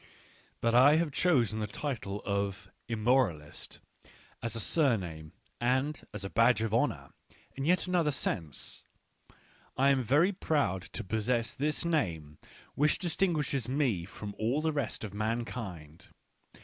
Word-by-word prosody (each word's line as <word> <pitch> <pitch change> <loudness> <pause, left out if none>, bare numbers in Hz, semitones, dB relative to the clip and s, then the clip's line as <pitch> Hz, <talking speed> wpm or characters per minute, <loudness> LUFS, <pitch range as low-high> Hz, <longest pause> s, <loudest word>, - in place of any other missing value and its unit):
But 115 0 +2
I 130 +5 +7
have 160 -1 +1
chosen 125 - +2
the 105 - -2
title 105 -4 -4
of 100 -1 -2 0.2
Immoral 115 - +2
is 75 - -9
t - - -13 0.6
as 115 -1 -3
a - - -2
surname 95 - 0 0.3
and 130 +5 0
as 105 -2 -6
a - - -4
badge 115 0 +4
of 110 -1 -2
honour 115 - 0 0.4
in 135 - -3
yet 180 +2 +3
another 175 -4 +2
sense; 80 - -3 0.9
I 135 +2 +4
am 135 -2 +3
very 145 - +3
proud 145 - 0
to 115 - -3
possess 110 +2 0
this 150 +4 -1
name 85 - -1 0.3
which 150 +1 +3
distinguishes 160 - 0
me 130 - +1
from 100 +2 -7
all 120 +7 +1
the 160 0 0
rest 140 -8 -3
of 105 -2 -6
mankind. 105 -7 -4
120 Hz, 145 wpm, -31 LUFS, 100-145 Hz, 0.9 s, I